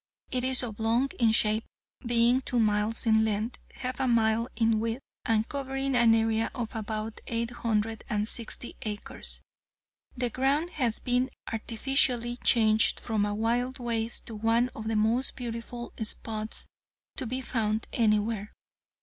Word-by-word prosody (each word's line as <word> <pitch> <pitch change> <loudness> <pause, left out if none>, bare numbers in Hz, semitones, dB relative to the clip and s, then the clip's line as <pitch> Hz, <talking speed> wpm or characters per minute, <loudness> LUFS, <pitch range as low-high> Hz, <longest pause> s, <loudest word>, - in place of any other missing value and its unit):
It 250 -1 +1
is 260 0 +5
oblong 230 +3 0
in 230 -2 +5
shape, 220 0 +2 0.4
being 240 +1 +3
two 250 - 0
miles 215 +1 +2
in 220 -1 +4
length, 220 +2 -1 0.2
half 255 +1 -4
a 265 - +1
mile 230 -1 +2
in 225 -1 +2
width 230 +4 -2 0.2
and 220 -1 +2
covering 270 -1 -2
an 235 -2 +6
area 225 0 +1
of 235 -3 -4
about 215 0 -4
eight 230 0 -1
hundred 225 -2 -1
and 210 0 0
sixty 235 +1 -4
acres. 210 -1 -7 0.7
The 245 -1 0
ground 280 +8 +1
has 245 -6 0
been 250 +1 0 0.2
artificially 240 +1 0
changed 220 -2 +4
from 215 -3 0
a 205 - -2
wild 240 +4 0
waste 235 -2 -2
to 225 - -6
one 230 +3 +2
of 220 -3 -7
the 225 - 0
most 225 +5 +1
beautiful 240 0 -6
spots 220 0 -2 0.5
to 260 - -2
be 255 +3 -2
found 220 -3 -1
anywhere. 215 -2 +1
230 Hz, 150 wpm, -28 LUFS, 220-245 Hz, 0.7 s, an